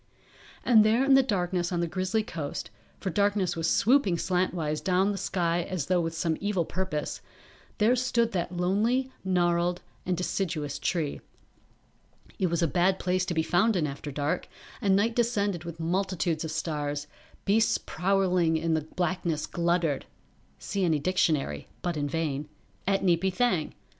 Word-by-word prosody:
And 225 -4 +7
there 225 +5 +3
in 275 - +5
the 270 - +8
darkness 180 -7 -1
on 175 - 0
the 170 - +1
grizzly 185 +5 -1
coast, 145 - -5 0.3
for 190 - -3
darkness 200 0 +1
was 165 0 0
swooping 225 -6 +3
slantwise 175 -4 -1
down 190 +1 +2
the - - -2
sky 175 -1 0
as 175 -4 -3
though 180 +1 +2
with 165 0 -3
some 160 -1 0
evil 200 -4 0
purpose, 185 -5 -3 0.6
there 225 +3 +4
stood 235 -2 +1
that 175 -1 -2
lonely, 225 +9 +1
gnarled 175 -1 +1 0.2
and 180 -1 -1
deciduous 160 -6 -2
tree. 155 -1 -1 1.2
It 185 - +2
was 170 0 0
a - - +4
bad 185 +4 +2
place 185 0 0
to 175 - -2
be 160 - +2
found 195 +7 +2
in 170 -4 +1
after 145 +1 -5
dark, 145 +5 -2 0.3
and 195 -2 +3
night 225 +4 +2
descended 205 -7 0
with 170 -1 -7
multitudes 175 -2 -1
of 160 - -4
stars, 150 -2 -2 0.4
beasts 215 +2 +3
prowling 180 -3 +1
in 165 +1 0
the 160 - +1
blackness 170 0 -2
gluttered 170 -4 0 0.5
[See 195 -1 -3
any 165 -3 +3
dictionary, 155 - 0 0.2
but 175 -1 -1
in 145 -1 -1
vain.] 150 -2 -2 0.4
at 195 0 +2
Neepy 185 +1 +2
Thang. 185 -7 0
180 Hz, 160 wpm, -28 LUFS, 160-195 Hz, 1.2 s, the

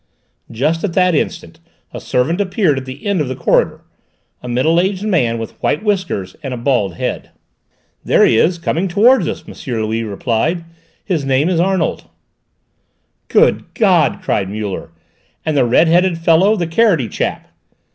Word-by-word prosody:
Just 155 +8 -1
at 195 -5 -2
that 180 -1 +3
instant 150 - -3 0.3
a - - -5
servant 160 +10 0
appeared 185 -7 +1
at 130 - -10
the 130 +6 -10
end 200 -5 +1
of 145 - -2
the 130 - -4
corridor, - - +1 0.6
a - - -9
middle 135 +8 +2
aged 190 +2 -1
man 155 - +1
with 115 -1 -8
white 150 - 0
whiskers 185 - -2
and 135 -4 -4
a - - -7
bald 120 -8 0
head. - - -4 0.7
"There - - +4
he - - +3
is, 170 +10 +2
coming 170 +2 -1
towards 210 +2 +4
us," - - -4
M. - - -9 0.3
Louis 110 +1 -2
replied. 115 - -1 0.4
"His 170 -7 -1
name 135 +4 +1
is 175 -3 0
Arnold." 185 -1 0 1.2
"Good - - +2
God!" - - +2
cried 95 -2 -1
Muller; 105 -4 -5 0.6
"and 155 - -1
the 135 -3 +3
red 125 +8 +3
headed 175 +1 +3
fellow: 165 +6 +3
the 175 -5 -1
carroty 165 - +2
chap?" - - -4
160 Hz, 165 wpm, -17 LUFS, 125-185 Hz, 1.2 s, There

